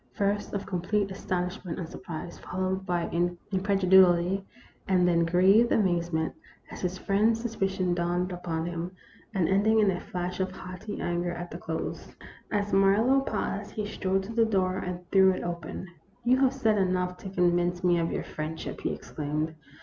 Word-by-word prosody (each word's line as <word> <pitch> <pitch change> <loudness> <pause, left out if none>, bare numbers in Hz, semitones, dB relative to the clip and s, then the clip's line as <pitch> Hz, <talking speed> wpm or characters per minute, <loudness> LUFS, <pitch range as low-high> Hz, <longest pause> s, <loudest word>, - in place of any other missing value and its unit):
First 205 +1 0
of 200 - -3
complete 195 +2 -1
astonishment 180 -1 -3
and 170 - -4
surprise, 170 -1 -7
fol 180 - -6
lowed 190 0 -1
by 175 -1 0 0.5
incredulity; 190 -1 +4 0.4
and 180 -2 +3
then 170 -1 +3
grieved 190 +7 +5
amazement, 170 -5 +1 0.4
as - - -8
his 180 0 -2
friend's 215 +4 +2
suspicion 195 -6 -1
dawned 175 +1 0
upon 170 -2 -3
him, 175 +1 -4 0.4
and 180 -4 +2
ending 210 +3 +3
in 205 -2 +4
a 180 - -3
flash 180 +1 -4
of 190 0 0
haughty 185 +3 -7
anger 175 0 -1
at 175 0 -6
the - - -6
close. - - -5 0.4
As 205 -1 -1
Marlowe 205 +7 +5
paused, - - -3
he 215 -2 -2
strode 195 -1 -1
to 215 +4 -7
the 230 0 +4
door 190 -4 +1
and 180 -1 -5
threw 190 -1 +6
it - - -4
open. 170 0 -5 0.2
" 200 +5 -35
You 250 +2 +5
have 265 -1 +4
said 220 -5 +2
enough 180 -1 0
to 190 - -8
convince 175 -1 +1
me 175 -1 +4
of 165 0 0
your - - -2
friendship," 155 +1 -5
he - - -1
exclaimed. 155 +1 -3
185 Hz, 175 wpm, -28 LUFS, 175-200 Hz, 0.5 s, threw